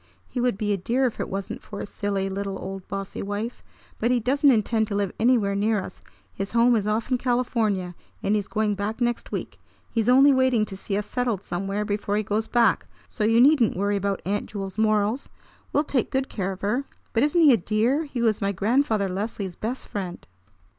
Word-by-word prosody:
He 250 - -4
would 245 -5 +1
be 210 -1 0
a - - 0
dear 240 +8 +1
if 245 - -2
it - - -2
wasn't 195 0 -4
for 200 - -8
his - - -5
silly 200 -1 -2
little 195 0 -3
old 190 0 -7
bossy 195 -1 -5
wife! 205 +4 -4 0.4
But 235 - +1
he 250 -1 +3
doesn't 275 +5 +3
intend 220 -2 +2
to 205 - -3
live 200 -2 0
anywhere 225 -4 +3
near 210 +2 +1
us. 185 - -8 0.3
His 195 +2 -5
home 235 +1 +5
is 210 -2 0
off 220 +4 -1
in 250 - +2
California, 225 -7 0 0.3
and 200 - +1
he's 205 -2 0
going 215 -1 0
back 205 +3 -3
next 240 -1 -1
week. - - -5 0.3
He's 230 -1 +1
only 270 +3 +7
waiting 260 -4 +3
to 195 - -8
see 195 +1 -3
us 205 - -2
settled 240 -6 -1
somewhere 195 +3 -2
before 205 0 -1
he 215 - 0
goes 215 +2 -1
back; 235 -5 +2 0.2
so 215 - -3
you 225 +2 +4
needn't 255 - +5
worry 200 +1 +1
about 200 0 -2
Aunt 205 +2 -1
Jewel's 195 -1 -6
morals. 215 +3 +1 0.4
We'll 290 - +2
take 275 -5 0
good 265 0 -1
care 195 -2 -2
of 190 - -8
her. 240 +7 0 0.3
But 225 - +2
isn't 300 +5 +3
he 295 -5 +8
a - - +4
dear? 225 - +1
He 255 -5 -3
was 220 -3 +2
my 200 0 +1
Grandfather 215 +1 +1
Leslie's 195 -1 -4
best 240 +4 -4
friend." 185 -4 -5
215 Hz, 215 wpm, -25 LUFS, 200-240 Hz, 0.4 s, he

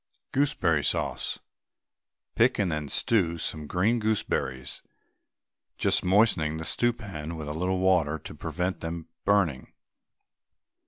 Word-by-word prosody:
GOOSEBERRY 135 - +2
SAUCE. - - 0 1.0
Pick 120 +3 +3
and 95 -5 +1
then 75 -2 -3
stew 90 -7 +2
some 80 -2 -2
green 105 +9 +2
gooseberries, 100 - -2 1.0
just - - +2
moistening 90 -6 +3
the 80 - -5
stewpan 95 -10 -2
with 80 -2 -6
a 75 - -3
little 90 +4 0
water 90 -5 +2
to - - -10
prevent 90 +2 -3
them 80 0 -5 0.2
burning. 95 -10 +1
90 Hz, 115 wpm, -27 LUFS, 80-105 Hz, 1.0 s, Pick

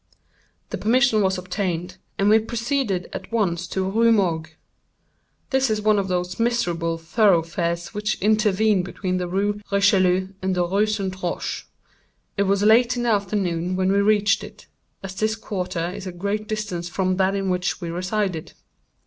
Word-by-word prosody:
The - - -3
permission 240 -1 +3
was 190 -1 +1
obtained, 180 -1 -3 0.2
and 200 - +2
we 215 +1 +6
proceeded 225 -4 -2
at - - -7
once 180 -6 0
to 190 - -2
the - - -1
Rue 225 +4 +3
Morgue. 170 -7 +1 1.0
This 265 -1 +2
is 215 -1 0
one 210 -1 +3
of 195 - -2
those 180 +1 -2
miserable 175 -9 0
thoroughfares 170 -2 +1
which 210 0 -2
intervene 215 -1 +3
between 185 0 -3
the 180 -1 -2
Rue 205 +3 -1
Richelieu 190 -2 +3
and 190 0 0
the 180 -1 +1
Rue 200 +4 +2
St. 190 -3 -3
Roch. 175 - -3 0.7
It 200 -1 +1
was 200 0 +2
late 235 +3 +5
in 240 - -1
the 240 - +1
afternoon 185 -4 -1
when 185 0 +1
we 200 0 +3
reached 205 0 +3
it, - - -12 0.4
as 190 -1 -6
this 215 +2 0
quarter 185 -5 -3
is 190 - -7
at 180 - -7
a - - -14
great 205 +3 -2
distance 205 -6 -3
from 185 0 0
that 190 +1 +2
in 195 -1 -1
which 180 0 -1
we 170 -3 -5
resided. 185 -1 -2
195 Hz, 175 wpm, -23 LUFS, 180-215 Hz, 1.0 s, we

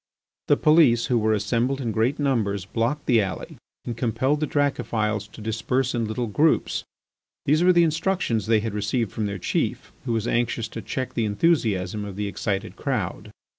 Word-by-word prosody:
The - - +4
police, 150 -7 +5
who 120 -2 +2
were 110 0 +2
assembled 120 +6 0
in 120 -4 -2
great 115 +7 +1
numbers, 110 -9 0
blocked 115 +9 -1
the 120 -4 +4
alley 95 -4 -5 0.3
and 120 - -4
compelled 130 +5 0
the 155 - 0
Dracophils 110 -7 0
to 110 - -13
disperse 120 +4 -1
in 120 -2 0
little 110 +3 -2
groups. 150 +9 +1 0.6
These 155 +4 +3
were 185 - +6
the 175 -1 +5
instructions 165 - 0
they 110 -1 +3
had 110 -1 -3
received 105 +2 -1
from 110 -2 -2
their 100 -1 -4
chief, - - -2
who 120 - -1
was 115 0 -1
anxious 120 -1 0
to 115 - -6
check 130 +2 -4
the 115 - 0
enthusiasm 105 - +1
of 100 -2 -7
the 105 +1 -2
excited 100 -1 -3
crowd. - - -3
115 Hz, 180 wpm, -24 LUFS, 105-135 Hz, 0.6 s, were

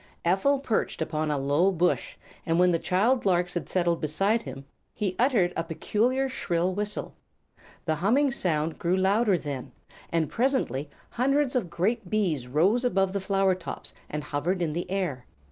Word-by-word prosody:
Ephel 195 +11 +3
perched 250 -5 -1
upon 155 -1 -1
a 150 - 0
low 145 +8 +2
bush, 175 -1 0 0.3
and 165 0 0
when 180 0 +5
the 165 - +1
child 225 +10 +2
larks 180 -2 +1
had 175 - -4
settled 175 -2 +1
beside 195 +9 +1
him 135 0 -8 0.3
he 195 -4 -2
uttered 225 -9 +3
a - - -1
peculiar, 230 +10 0
shrill 180 -8 -1
whistle. 210 +2 -3 0.7
The 160 - +1
humming 235 - +2
sound 160 - -1
grew 175 +2 +1
louder, 200 +1 +3
then, 140 -5 -6 0.4
and 165 -2 +1
presently 230 - 0 0.2
hundreds 275 +2 +1
of 220 -9 0
great 205 +3 -1
bees 175 - 0
rose 185 - +2
above 195 -5 +1
the 200 - 0
flower 195 0 +2
tops 180 -2 -6 0.2
and 150 0 -4
hovered 150 +6 -1
in 165 -3 -1
the 175 +2 -4
air. 180 -10 -2
185 Hz, 165 wpm, -27 LUFS, 160-215 Hz, 0.7 s, when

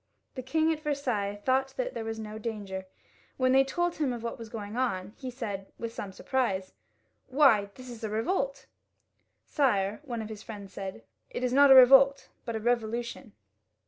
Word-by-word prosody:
The 260 - -5
king 315 +5 +1
at 310 - -6
Versailles 250 -10 -2
thought 265 +1 +1
there - - -3
was 225 0 -4
no 215 0 -7
danger. 200 -4 -5 0.5
When 255 -1 +3
they 270 +1 +6
told 345 +6 -1
him 290 -4 0
of 235 -2 -5
what 235 - -4
was 225 -1 -8
going 215 -1 -6
on, 205 -6 -1
he 260 - -6
said, 210 -6 -6
with 230 -1 -5
some 200 -4 -6
surprise, 195 -4 -1 0.5
"Why, 255 -7 +4
this 255 0 -11
is 240 -2 -9
a 220 - -2
revolt!" 275 - -1 0.4
" - - -48
Sire, 210 -8 +1
one 240 -6 -4
of 215 - -8
his 215 -2 -8
friends 200 -4 -9
said, 190 - -6
" - - -49
it 250 - -5
is 250 0 0
not 280 +1 +7
a 265 - +10
revolt, 270 +2 +7 0.2
but 230 - -3
a - - -1
revolution." 235 0 -2
235 Hz, 190 wpm, -29 LUFS, 210-270 Hz, 0.5 s, a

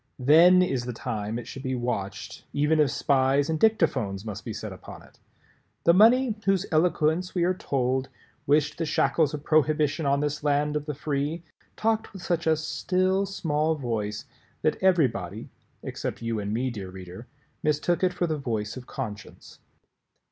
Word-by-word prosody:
Then 170 +7 +6
is 130 -9 -1
the 125 - -4
time 110 -2 -4
it 120 - -7
should 135 - -8
be 130 -1 -2
watched, 120 -6 -4
even 150 +2 +2
if 150 -2 +4
spies 140 +3 +2
and 160 - -1
dictaphones 130 - +1
must 105 -3 -6
be - - -5
set - - -6
upon - - -11
it. - - -21 0.6
The 170 - +5
money 230 +5 +5
whose 195 -1 +2
eloquence, 165 +2 +1
we 175 - +2
are 180 +2 +2
told, 130 -5 -1 0.4
wished 150 +2 +2
the 165 - 0
shackles 150 0 +1
of 145 - -8
Prohibition 155 -1 +2
on 140 0 +2
this 150 0 -2
land 150 0 +1
of 150 0 -3
the 150 - -3
free, 150 +3 -2 0.3
talked 220 0 0
with 190 -2 -9
such 170 -2 -1
a 160 -1 +4
"still 185 +4 0
small 160 -4 0
voice" 110 -7 -3 0.4
that 155 - 0
everybody 140 - +1 0.3
(except - - -5
you 115 -1 -1
and 100 0 -3
me, 125 +4 -1
dear 100 -5 -7
Reader) 95 +5 -10 0.3
mistook 155 +4 0
it 185 - +3
for 180 0 -1
the 160 -2 -1
voice 110 -5 -3
of 130 -1 -9
conscience. 105 -7 -8
150 Hz, 170 wpm, -26 LUFS, 125-170 Hz, 0.6 s, Then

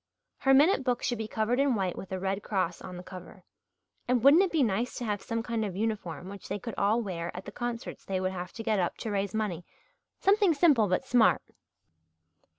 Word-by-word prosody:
Her 270 - +4
minute 295 +2 +5
book 250 -2 0
should 240 -3 -1
be 220 - -3
covered 220 +4 0
in 275 -3 +3
white 190 -4 -1
with 190 - -9
a 190 - -2
Red 195 +2 -2
Cross 185 -5 -2
on 180 - -8
the 180 - -8
cover 185 0 -11 0.6
and 245 -2 +1
wouldn't 285 +6 +8
it 385 - +1
be 315 -4 +3
nice 230 +2 -1
to 245 - -4
have 205 -2 -2
some 230 0 -3
kind 230 -2 -2
of 195 -4 -4
uniform 200 -5 -3
which 200 0 -9
they 200 - -2
could 220 +3 -6
all 215 +4 +2
wear 170 -4 -4
at 185 - -7
the 200 - -7
concerts 240 +1 -5
they 190 -1 -2
would 185 0 -1
have 180 -1 -6
to 225 - -7
get 215 -3 +1
up 175 - -1
to 220 - -4
raise 200 0 -1
money 195 -6 -2 0.6
something 395 -4 +4
simple 280 -9 +4
but 185 +7 0
smart? 245 -3 +4
215 Hz, 225 wpm, -29 LUFS, 190-245 Hz, 0.6 s, wouldn't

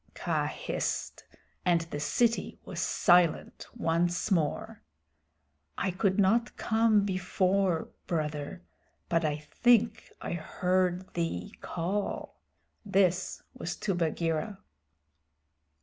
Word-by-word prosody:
Kaa - - 0
hissed, - - -3 0.4
and 175 -2 +3
the 165 -3 -5
city 230 +9 +1
was - - -6
silent 175 -2 +3
once 175 +4 0
more. 160 -6 0 1.0
"I 190 0 0
could 190 +1 +1
not 220 +4 +2
come 220 -2 +3
before, 185 -1 +1 0.2
Brother, 150 - -3 0.5
but 165 0 +2
I 150 -1 0
think 235 +8 +2
I - - -4
heard 180 +2 0
thee 165 - -2
call" 185 +4 -3 0.5
this 185 -3 +1
was 175 - -4
to 200 - -1
Bagheera. 170 +3 -1
180 Hz, 100 wpm, -30 LUFS, 165-200 Hz, 1.0 s, and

